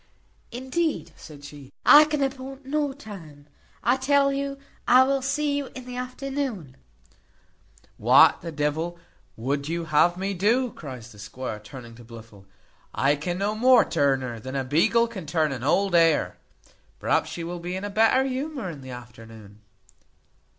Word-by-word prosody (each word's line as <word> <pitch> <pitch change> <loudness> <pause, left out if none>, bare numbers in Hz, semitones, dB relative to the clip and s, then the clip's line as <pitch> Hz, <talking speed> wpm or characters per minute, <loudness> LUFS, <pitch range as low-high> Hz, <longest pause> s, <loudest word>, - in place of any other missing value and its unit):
"Indeed," 260 - -2
said 145 -2 -13
she, 145 -2 -12
"I 300 +1 +9
can 300 -2 -1
appoint 270 0 -5
no 290 +1 -1
time. 180 - -12 0.4
I 245 +4 +3
tell 275 +1 +2
you 275 0 -3 0.3
I 255 +1 +7
will 275 +1 0
see 285 +2 -1
you 285 -1 -2
in 255 -1 -8
the 250 0 -8
afternoon." 250 - -4 1.2
"What - - +5
the 165 - -6
devil 155 +3 -2 0.4
would 140 +5 -2
you 170 0 -2
have 160 +3 +3
me 195 +2 -2
do?" 230 +7 +1
cries 125 - -10
the 105 - -15
squire, 105 +2 -6
turning 115 +2 -11
to 120 - -13
Blifil; 110 -4 -14 0.5
"I 140 +2 +2
can 175 +5 -4
no 200 +2 -1
more 245 +1 +5
turn 140 -4 +1
her, 120 -3 -5
than 130 +4 -7
a 135 - -1
beagle 170 - +2
can 195 -9 -8
turn 155 -1 +1
an 130 -2 -5
old 195 +7 +1
hare. 165 - +3 0.6
Perhaps - - +1
she 170 - -6
will 175 +1 -5
be 175 +2 -5
in 190 - -5
a 205 - -4
better 225 +5 +4
humour 265 - -4
in 145 -4 -10
the 130 - -10
afternoon." 115 -4 -12
175 Hz, 165 wpm, -25 LUFS, -, 1.2 s, I